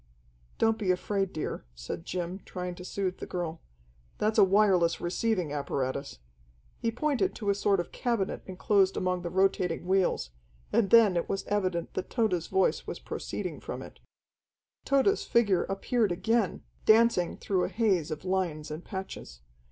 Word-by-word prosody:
"Don't 225 Hz, 0 st, +2 dB
be 200 Hz, -4 st, -1 dB
afraid, 195 Hz, +1 st, 0 dB
dear," 155 Hz, -, -4 dB
said -, -, -6 dB
Jim, 180 Hz, +1 st, -3 dB
trying 180 Hz, -1 st, -5 dB
to 180 Hz, -, -10 dB
soothe 185 Hz, 0 st, -3 dB
the -, -, -6 dB
girl. 170 Hz, -2 st, -4 dB, 0.6 s
"That's 215 Hz, +1 st, +1 dB
a -, -, +9 dB
wireless 190 Hz, -4 st, +4 dB
receiving 180 Hz, -3 st, -1 dB
apparatus." 140 Hz, -, -3 dB, 0.6 s
He 230 Hz, -, 0 dB
pointed 300 Hz, +9 st, 0 dB
to 205 Hz, -3 st, 0 dB
a -, -, +3 dB
sort 200 Hz, -1 st, +2 dB
of 175 Hz, -, -4 dB
cabinet 235 Hz, -6 st, -1 dB
enclosed 190 Hz, +1 st, +2 dB
among 180 Hz, -1 st, 0 dB
the 175 Hz, -, -4 dB
rotating 185 Hz, -2 st, +1 dB
wheels, 185 Hz, -, +1 dB, 0.4 s
and 210 Hz, -4 st, +3 dB
then 220 Hz, -4 st, +7 dB
it 170 Hz, -, -1 dB
was 195 Hz, -, -2 dB
evident 185 Hz, -4 st, -1 dB
that 185 Hz, -, -4 dB
Tode's 195 Hz, -9 st, 0 dB
voice 190 Hz, 0 st, +1 dB
was -, -, -4 dB
proceeding -, -, -5 dB
from -, -, -6 dB
it. -, -, -13 dB, 0.9 s
Tode's 275 Hz, +10 st, +3 dB
figure 210 Hz, -6 st, +2 dB
appeared 205 Hz, +2 st, 0 dB
again, 200 Hz, +4 st, 0 dB, 0.2 s
dancing 220 Hz, -5 st, +4 dB
through 185 Hz, -3 st, 0 dB
a -, -, -3 dB
haze 195 Hz, -9 st, +1 dB
of 155 Hz, +3 st, -5 dB
lines 175 Hz, -5 st, -1 dB
and 155 Hz, +3 st, -6 dB
patches. 190 Hz, -, -7 dB
190 Hz, 160 wpm, -29 LUFS, 175-210 Hz, 0.9 s, a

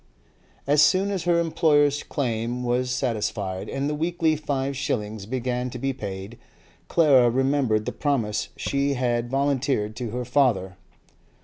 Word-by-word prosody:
As 145 Hz, +1 st, +4 dB
soon 195 Hz, +4 st, +3 dB
as 190 Hz, -4 st, -3 dB
her 170 Hz, -1 st, +3 dB
employer's 145 Hz, -3 st, +2 dB
claim 120 Hz, -2 st, -2 dB
was 125 Hz, +1 st, 0 dB
satisfied, 105 Hz, -6 st, -2 dB
and 135 Hz, +1 st, -2 dB
the 150 Hz, -, -1 dB
weekly 165 Hz, +1 st, 0 dB
five 140 Hz, -2 st, -2 dB
shillings 105 Hz, -5 st, -3 dB
began 125 Hz, 0 st, -2 dB
to 125 Hz, -, -7 dB
be 135 Hz, +2 st, -1 dB
paid, 100 Hz, -1 st, -7 dB, 0.5 s
Clara 140 Hz, -7 st, +5 dB
remembered 130 Hz, -4 st, +1 dB
the -, -, -2 dB
promise 110 Hz, -8 st, -1 dB
she 140 Hz, 0 st, 0 dB
had 120 Hz, -1 st, 0 dB
volunteered 135 Hz, -5 st, 0 dB
to 120 Hz, -2 st, -4 dB
her 125 Hz, +3 st, -4 dB
father. 110 Hz, -9 st, +1 dB
130 Hz, 140 wpm, -24 LUFS, 115-145 Hz, 0.5 s, Clara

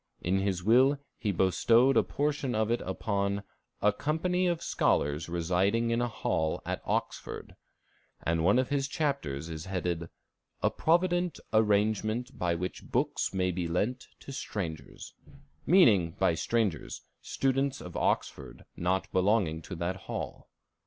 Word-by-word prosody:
In 95 Hz, +3 st, 0 dB
his 95 Hz, -2 st, -1 dB
will 130 Hz, +7 st, +5 dB, 0.2 s
he 105 Hz, -, 0 dB
bestowed 115 Hz, +8 st, +4 dB
a -, -, +6 dB
portion 145 Hz, -4 st, -1 dB
of 110 Hz, +1 st, +1 dB
it 120 Hz, -, +1 dB
upon 100 Hz, +1 st, -1 dB, 0.4 s
"a 105 Hz, 0 st, +4 dB
company 180 Hz, -, 0 dB
of 170 Hz, -1 st, -1 dB
scholars 75 Hz, +3 st, +1 dB
residing 95 Hz, +7 st, +1 dB
in 115 Hz, +1 st, +1 dB
a 120 Hz, -, +1 dB
hall 80 Hz, -8 st, -1 dB
at -, -, -3 dB
Oxford," -, -, -3 dB, 0.7 s
and 80 Hz, 0 st, +1 dB
one 100 Hz, +7 st, +4 dB
of 130 Hz, -1 st, +1 dB
his 140 Hz, -1 st, 0 dB
chapters 140 Hz, -, -2 dB
is 80 Hz, -1 st, -6 dB
headed 90 Hz, -3 st, -2 dB, 0.5 s
"A -, -, +3 dB
Provident 175 Hz, +1 st, +1 dB
Arrangement 110 Hz, +2 st, +1 dB
by 85 Hz, -1 st, 0 dB
which 90 Hz, +2 st, -5 dB
Books -, -, 0 dB
may 90 Hz, -1 st, 0 dB
be 90 Hz, -1 st, -2 dB
lent 105 Hz, +10 st, -1 dB
to -, -, -9 dB
Strangers," 85 Hz, -, -6 dB, 0.5 s
meaning, 105 Hz, -, +5 dB
by 95 Hz, -3 st, +3 dB
strangers, 105 Hz, +1 st, -1 dB, 0.2 s
students 135 Hz, 0 st, 0 dB
of 90 Hz, -, -9 dB
Oxford -, -, -2 dB
not 95 Hz, +2 st, 0 dB
belonging 95 Hz, -4 st, +2 dB
to 90 Hz, -, -7 dB
that 85 Hz, +3 st, -2 dB
hall. 95 Hz, -, -6 dB
100 Hz, 140 wpm, -30 LUFS, 90-130 Hz, 0.7 s, a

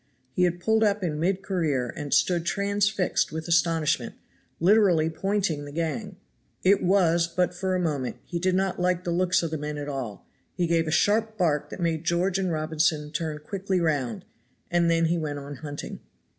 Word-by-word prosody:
He 180 Hz, +6 st, +2 dB
had 175 Hz, 0 st, -1 dB
pulled 220 Hz, +4 st, +2 dB
up 205 Hz, -2 st, +1 dB
in 155 Hz, -4 st, -2 dB
mid 185 Hz, +4 st, 0 dB
career 150 Hz, -, -1 dB
and 145 Hz, -1 st, -6 dB
stood 170 Hz, +3 st, +3 dB
transfixed 200 Hz, +1 st, 0 dB
with 160 Hz, +1 st, -5 dB
astonishment, 165 Hz, -2 st, +1 dB, 0.4 s
literally 175 Hz, -4 st, +4 dB
pointing 185 Hz, -4 st, -1 dB
the 145 Hz, -, -8 dB
gang; 170 Hz, +6 st, -3 dB, 0.5 s
it 195 Hz, +2 st, +4 dB
was 175 Hz, -3 st, +3 dB
but 180 Hz, +1 st, 0 dB
for 185 Hz, +1 st, -1 dB
a -, -, 0 dB
moment 145 Hz, -7 st, -1 dB
he 175 Hz, -, -4 dB
did 185 Hz, +1 st, +1 dB
not 190 Hz, -1 st, 0 dB
like 180 Hz, 0 st, +1 dB
the 175 Hz, -, -2 dB
looks 180 Hz, +1 st, +2 dB
of 165 Hz, -, -2 dB
the 160 Hz, -, -3 dB
men 150 Hz, 0 st, -4 dB
at 145 Hz, 0 st, -5 dB
all; 130 Hz, -8 st, -5 dB, 0.3 s
he 175 Hz, -, +1 dB
gave 165 Hz, -1 st, +1 dB
a -, -, -1 dB
sharp 215 Hz, +6 st, +2 dB
bark 155 Hz, -5 st, +1 dB
that -, -, -8 dB
made 165 Hz, -2 st, -1 dB
George 175 Hz, +3 st, +1 dB
and 185 Hz, -2 st, 0 dB
Robinson 155 Hz, -1 st, 0 dB
turn 155 Hz, -1 st, -3 dB
quickly 195 Hz, 0 st, -1 dB
round, 140 Hz, -9 st, -1 dB, 0.5 s
and 170 Hz, -1 st, +3 dB
then 165 Hz, 0 st, +3 dB
he 170 Hz, +1 st, +1 dB
went 150 Hz, -2 st, -3 dB
on 140 Hz, 0 st, -7 dB
hunting. 145 Hz, 0 st, -7 dB
170 Hz, 190 wpm, -26 LUFS, 155-185 Hz, 0.5 s, literally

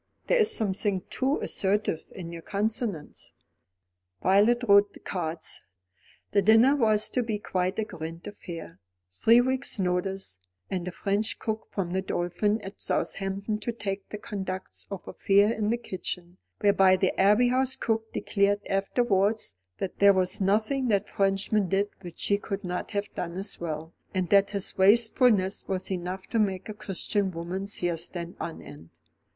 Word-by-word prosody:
There -, -, +3 dB
is 440 Hz, 0 st, +4 dB
something 200 Hz, -, 0 dB
too 270 Hz, +3 st, +1 dB
assertive 195 Hz, -4 st, -1 dB
in 170 Hz, -3 st, -7 dB
your 165 Hz, -, -7 dB
consonants." 210 Hz, -4 st, -3 dB, 0.9 s
Violet 210 Hz, +6 st, +4 dB
wrote 200 Hz, 0 st, +6 dB
the -, -, -12 dB
cards. 165 Hz, -3 st, -2 dB, 0.7 s
The 200 Hz, -, +4 dB
dinner 225 Hz, +7 st, +6 dB
was 215 Hz, -5 st, +3 dB
to 250 Hz, -, +1 dB
be 225 Hz, -3 st, -2 dB
quite 185 Hz, -2 st, -2 dB
a 220 Hz, -, +1 dB
grand 165 Hz, -4 st, -7 dB
affair, 170 Hz, -, -8 dB, 0.3 s
three 230 Hz, -, +5 dB
weeks' 260 Hz, +1 st, -1 dB
notice, 180 Hz, -, -1 dB, 0.3 s
and 180 Hz, -2 st, -2 dB
a -, -, -2 dB
French 205 Hz, +4 st, 0 dB
cook 220 Hz, 0 st, -4 dB
from 180 Hz, -4 st, -3 dB
The 190 Hz, -, +1 dB
Dolphin 190 Hz, +4 st, 0 dB
at 195 Hz, +1 st, -9 dB
Southampton 195 Hz, +2 st, -2 dB
to 235 Hz, -, -3 dB
take 200 Hz, -3 st, -5 dB
the 210 Hz, -, -5 dB
conduct 190 Hz, -2 st, -6 dB
of 195 Hz, -2 st, -7 dB
affairs 200 Hz, +3 st, +3 dB
in 210 Hz, -1 st, -1 dB
the 235 Hz, -, +1 dB
kitchen; 180 Hz, -4 st, -6 dB, 0.2 s
whereby 195 Hz, -2 st, +5 dB
the 185 Hz, 0 st, +2 dB
Abbey 210 Hz, +6 st, +5 dB
House 260 Hz, +1 st, +2 dB
cook 225 Hz, -3 st, -1 dB
declared 200 Hz, 0 st, +1 dB
afterwards 200 Hz, -, +1 dB, 0.2 s
that 190 Hz, -, -5 dB
there 200 Hz, 0 st, +7 dB
was 185 Hz, +1 st, 0 dB
nothing 220 Hz, +7 st, +1 dB
that 205 Hz, -3 st, +1 dB
Frenchman 195 Hz, 0 st, +1 dB
did 200 Hz, +2 st, +1 dB
which 175 Hz, -3 st, -10 dB
she 200 Hz, 0 st, +2 dB
could 200 Hz, 0 st, -5 dB
not 180 Hz, -1 st, -3 dB
have 205 Hz, -1 st, -3 dB
done 175 Hz, 0 st, -4 dB
as 195 Hz, -, -2 dB
well, 160 Hz, -1 st, -5 dB, 0.2 s
and 185 Hz, -2 st, 0 dB
that 200 Hz, 0 st, +5 dB
his 200 Hz, -2 st, -1 dB
wastefulness 210 Hz, -1 st, +4 dB
was 190 Hz, 0 st, -3 dB
enough 185 Hz, +1 st, -4 dB
to 230 Hz, -, -1 dB
make 195 Hz, -3 st, 0 dB
a 215 Hz, -, -5 dB
Christian 200 Hz, 0 st, -1 dB
woman's 185 Hz, +4 st, -4 dB
hair 175 Hz, -1 st, -1 dB
stand 170 Hz, +1 st, -4 dB
on 165 Hz, -, -5 dB
end. 80 Hz, +3 st, -12 dB
195 Hz, 160 wpm, -27 LUFS, 185-215 Hz, 0.9 s, there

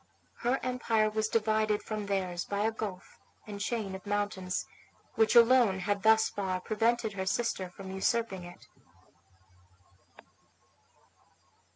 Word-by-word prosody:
Her 245 Hz, +3 st, +1 dB
empire 230 Hz, -4 st, +1 dB
was 215 Hz, 0 st, 0 dB
divided 215 Hz, -1 st, +1 dB
from 215 Hz, -2 st, -4 dB
theirs 185 Hz, -3 st, -1 dB
by 200 Hz, 0 st, -3 dB
a 220 Hz, +2 st, +2 dB
gulf 205 Hz, -4 st, -7 dB, 0.3 s
and 205 Hz, -1 st, -7 dB
chain 215 Hz, -3 st, -2 dB
of 190 Hz, -1 st, -7 dB
mountains, 205 Hz, -3 st, -2 dB, 0.5 s
which 225 Hz, 0 st, +2 dB
alone 235 Hz, -5 st, +6 dB
had 200 Hz, +2 st, -1 dB
thus 220 Hz, +1 st, +5 dB
far 190 Hz, -2 st, -3 dB
prevented 225 Hz, +2 st, 0 dB
her 190 Hz, -1 st, -3 dB
sister 195 Hz, -4 st, -1 dB
from 190 Hz, +1 st, -9 dB
usurping 190 Hz, 0 st, -1 dB
it. 175 Hz, -, -13 dB
210 Hz, 120 wpm, -30 LUFS, 190-225 Hz, 0.5 s, alone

